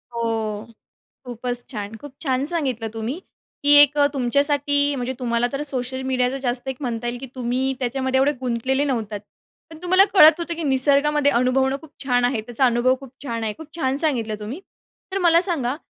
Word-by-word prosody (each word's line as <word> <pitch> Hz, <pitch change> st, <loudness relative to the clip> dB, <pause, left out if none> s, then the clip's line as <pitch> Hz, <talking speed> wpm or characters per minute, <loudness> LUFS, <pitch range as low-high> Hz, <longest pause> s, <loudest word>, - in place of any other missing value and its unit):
हो, 225 Hz, -2 st, -2 dB, 0.6 s
खूपच 245 Hz, 0 st, -5 dB
छान. 210 Hz, -2 st, -6 dB
खूप 290 Hz, +3 st, -11 dB
छान 265 Hz, -3 st, 0 dB
सांगितलं 265 Hz, -9 st, -2 dB
तुम्ही, 230 Hz, +10 st, -4 dB, 0.4 s
की 290 Hz, 0 st, +6 dB
एक 290 Hz, +1 st, +3 dB
अ, 285 Hz, -, +5 dB
तुमच्यासाठी, 285 Hz, +2 st, +1 dB
म्हणजे 250 Hz, 0 st, -3 dB
तुम्हाला 240 Hz, -1 st, 0 dB
तर 275 Hz, +1 st, -3 dB
सोशल 260 Hz, -2 st, -3 dB
मीडियाच 250 Hz, -1 st, +1 dB
जास्त 245 Hz, +1 st, -2 dB
एक 265 Hz, -, -3 dB
म्हणता 240 Hz, -3 st, -3 dB
येईल, 240 Hz, +1 st, -3 dB
की 270 Hz, -, -6 dB
तुम्ही 255 Hz, +1 st, -1 dB
त्याच्यामध्ये 260 Hz, +1 st, 0 dB
एवढे 285 Hz, +2 st, +3 dB
गुंतलेले 260 Hz, +2 st, 0 dB
नव्हता 225 Hz, -7 st, -2 dB, 0.5 s
पण 320 Hz, -, -11 dB
तुम्हाला 370 Hz, +2 st, +5 dB
कळत 320 Hz, -3 st, +8 dB
होतं, 340 Hz, 0 st, -3 dB
की 335 Hz, -, -5 dB
निसर्गामध्ये 285 Hz, +1 st, +3 dB
अनुभवणं 265 Hz, +2 st, +2 dB
खूप 315 Hz, -, -15 dB
छान 245 Hz, -2 st, +2 dB
आहे, 245 Hz, -3 st, +1 dB
त्याचा 240 Hz, +3 st, -2 dB
अनुभव 245 Hz, +1 st, +3 dB
खूप 270 Hz, -2 st, -11 dB
छान 230 Hz, -4 st, -3 dB
आहे, 215 Hz, -, -1 dB
खूप 320 Hz, -, -9 dB
छान 265 Hz, -4 st, 0 dB
सांगितलं 250 Hz, -8 st, 0 dB
तुम्ही. 235 Hz, -, -6 dB, 0.5 s
तर 390 Hz, -, 0 dB
मला 340 Hz, -2 st, +4 dB
सांगा, 290 Hz, -8 st, -1 dB
260 Hz, 180 wpm, -22 LUFS, 240-285 Hz, 0.6 s, कळत